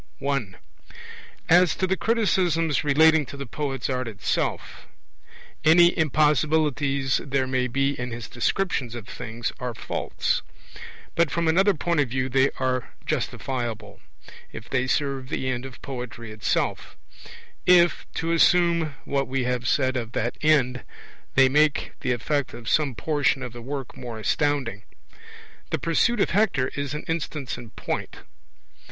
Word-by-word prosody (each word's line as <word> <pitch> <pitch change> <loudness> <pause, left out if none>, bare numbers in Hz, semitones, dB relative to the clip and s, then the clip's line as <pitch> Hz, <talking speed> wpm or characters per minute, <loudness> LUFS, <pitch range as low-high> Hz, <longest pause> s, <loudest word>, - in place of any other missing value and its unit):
I. 135 -6 0 1.0
As 175 +1 +5
to 190 - 0
the 190 0 +1
criticisms 180 - +1
relating 155 +2 +5
to 140 - -9
the 140 - -5
poet's 135 0 -3
art 130 -2 -2
itself. 105 -2 -3 0.8
Any 170 +3 +6
impossibilities 150 -2 +2
there 135 -1 0
may 130 -1 0
be 135 +2 +1
in 125 0 -3
his 120 -1 -6
descriptions 125 -2 -1
of 115 -4 -8
things 115 +2 -5
are 125 -2 -4
faults. - - -2 0.7
But 170 -2 +2
from 170 +2 -1
another 190 +5 +4
point 170 +1 0
of 140 -4 +2
view 130 +1 -1
they 135 +1 +3
are 130 -1 -1
justifiable, 120 -4 -3 0.5
if 110 - -9
they 130 -1 0
serve 135 -2 -1
the 130 - -2
end 130 0 -2
of 130 - -14
poetry 120 -4 -6
itself 105 -1 -2 0.7
if 175 -1 +5
(to 165 +1 -1
assume 170 -2 +3
what 140 -1 0
we 130 0 -1
have 125 0 -1
said 130 -1 +2
of 115 -2 -5
that 120 +2 -1
end) 130 -5 +3 0.5
they 135 0 +7
make 150 +2 +2
the - - -1
effect 130 +3 -1
of 115 -2 -10
some 140 -3 +2
portion 145 -1 0
of 125 -2 -6
the 120 - -8
work 135 +1 -6
more 120 -2 -7
astounding. 130 -2 0 0.9
The - - 0
Pursuit 210 +8 +1
of - - +1
Hector 185 -11 +2
is 140 0 -4
an 150 - -5
instance 155 -4 -3
in 120 -2 -10
point. - - -5
135 Hz, 145 wpm, -25 LUFS, 125-155 Hz, 1.0 s, they